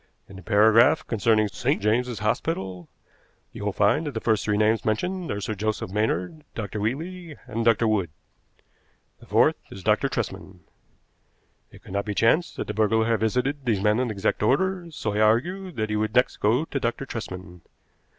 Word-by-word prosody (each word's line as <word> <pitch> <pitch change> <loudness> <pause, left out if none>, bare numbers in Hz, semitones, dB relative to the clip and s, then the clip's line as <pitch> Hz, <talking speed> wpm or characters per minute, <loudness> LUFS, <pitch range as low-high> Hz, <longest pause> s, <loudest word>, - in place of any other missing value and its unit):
In 95 - -13
the 95 - -10
paragraph 110 +3 +4
concerning 110 -1 +2
St. 125 +7 -1
James's 115 +3 0
Hospital 95 - -2 0.6
you - - -8
will 105 - 0
find 105 +11 +2
that 145 - -5
the - - -1
first 110 -2 +1
three 105 -1 0
names 110 +1 +2
mentioned 180 - -2
are 105 - -2
Sir 105 +2 -3
Joseph 105 -2 -3
Maynard, 105 - -1
Dr. 105 -1 -4
Wheatley, 160 - -4
and 115 -2 -3
Dr. 115 0 +3
Wood. 100 -6 +1 1.1
The - - -17
fourth - - +3
is 95 - -10
Dr. 110 +7 +2
Tresman. 95 -6 -5 1.1
It - - -16
could - - -12
not 100 0 -1
be 105 -1 -3
chance 155 - +3
that - - -4
the 105 - -4
burglar 110 +1 +2
had 115 -1 +1
visited 125 +6 0
these 110 -5 +1
men 105 +3 +2
in 125 -1 0
exact 105 -1 -1
order, 175 - +1
so 115 -9 -4
I 105 - -1
argued 170 - +1
that 110 -1 -2
he - - 0
would 110 0 -1
next 125 - +3
go 120 +9 +2
to 140 - -3
Dr. 120 +2 -2
Tresman. 90 -7 -7
110 Hz, 185 wpm, -25 LUFS, 105-125 Hz, 1.1 s, paragraph